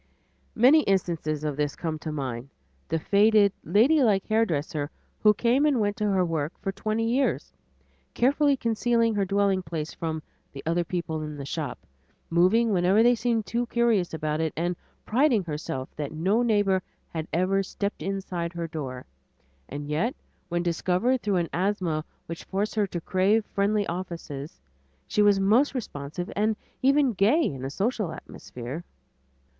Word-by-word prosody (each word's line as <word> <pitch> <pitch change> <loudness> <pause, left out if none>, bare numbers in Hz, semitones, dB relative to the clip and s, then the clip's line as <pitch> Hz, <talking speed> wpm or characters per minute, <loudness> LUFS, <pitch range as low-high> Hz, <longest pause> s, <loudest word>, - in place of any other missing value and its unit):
Many 265 +7 +6
instances 165 -6 0
of 150 -2 -1
this 145 -1 -1
come 165 -2 -3
into 155 0 -5
my 140 -4 -2
mind; 120 +4 -8 0.4
the 165 - 0
faded, 205 +3 +4
ladylike 220 - +4
hairdresser, 160 -9 0 0.3
who 210 - +6
came 245 +6 +2
and 290 -5 +3
went 205 -1 +1
to 210 -2 0
her 190 -2 +2
work 160 -2 -2
for 195 - -2
twenty 215 +3 -1
years, 260 +4 0 0.6
carefully 280 +2 +3
concealing 230 0 +1
her 200 -2 +1
dwelling 195 0 +2
place 160 -2 -5
from 160 -2 -4 0.3
the 135 - -8
"other 170 +2 +1
people 165 -2 -3
in 150 -1 -6
the 140 - -6
shop," - - -4 0.5
moving 190 +7 +4
whenever 190 +4 +4
they 240 +1 +6
seemed 230 -2 0
too 235 +5 -1
curious 230 -7 +2
about 155 -1 -2
it, 160 -1 0
and 175 +2 0 0.3
priding 245 -3 +3
herself 150 -5 -4
that 150 -1 -3
no 185 +9 +1
neighbor 205 -5 +2 0.3
had 160 -1 -4
ever 185 +3 +2
"stepped 200 0 -4
inside 180 -2 -3
her 170 -1 -3
door," 135 -6 -6 0.6
and 145 +1 -6
yet 160 - 0 0.3
when 175 0 0
discovered 185 +9 +1
through 205 -2 0
an 170 -2 0
asthma 180 -4 0 0.2
which 165 0 -7
forced 200 +2 -2
her 210 -2 +1
to 175 - -4
crave 195 +6 +2
friendly 205 +1 +1
offices, 165 -5 -6 0.5
she 210 - +1
was 205 -1 +5
most 230 +9 +3
responsive 165 - -5
and 215 +1 +1 0.3
even 275 -1 +4
gay 220 - +3
in 135 -2 -4
a 135 - -2
social 205 - -1
atmosphere. 125 +7 -8
190 Hz, 160 wpm, -26 LUFS, 160-220 Hz, 0.6 s, Many